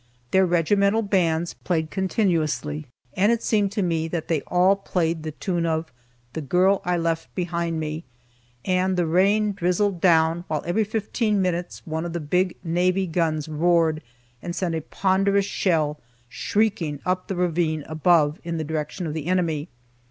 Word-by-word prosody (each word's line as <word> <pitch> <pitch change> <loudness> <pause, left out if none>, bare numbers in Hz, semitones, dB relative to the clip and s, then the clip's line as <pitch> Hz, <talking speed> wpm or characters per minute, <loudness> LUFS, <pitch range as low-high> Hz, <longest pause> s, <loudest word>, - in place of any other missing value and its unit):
Their 190 0 +4
regimental 200 +6 +2
bands 175 -4 +1
played 160 -3 -1
continuously 160 -6 -1 0.3
and 200 +4 +3
it 235 -1 0
seemed 205 -3 +1
to 205 - 0
me 165 -2 0
that 165 -1 -4
they 160 -4 +1
all 180 +2 +4
played 170 -4 -1
the 155 - -4
tune 175 +2 -2
of 160 -2 -2 0.4
"The 160 - -4
Girl 185 +7 +2
I 180 -2 0
Left 165 -1 -2
Behind 170 -2 -2
Me." 155 +1 -4 0.6
And 185 0 +1
the 175 - +2
rain 200 +6 +3
drizzled 180 0 0
down, 165 -1 +3
while 155 -2 -2
every 210 +5 +1
fifteen 215 0 -1
minutes 180 -2 -2
one 160 0 -3
of 170 -1 -5
the 170 - -2
big 180 +4 0
navy 180 +3 +1
guns 160 -3 -1
roared 160 0 +2 0.4
and 175 -1 -5
sent 180 -3 -1
a 160 - -2
ponderous 195 +4 +1
shell 155 -7 0 0.3
shrieking 170 - -1
up 185 0 -1
the 195 - -3
ravine 165 -3 0
above 155 -1 +2
in 170 -1 -3
the 160 - -2
direction 160 +4 -4
of 155 - -3
the 160 0 -4
enemy. 170 -4 0
175 Hz, 165 wpm, -24 LUFS, 160-190 Hz, 0.6 s, Their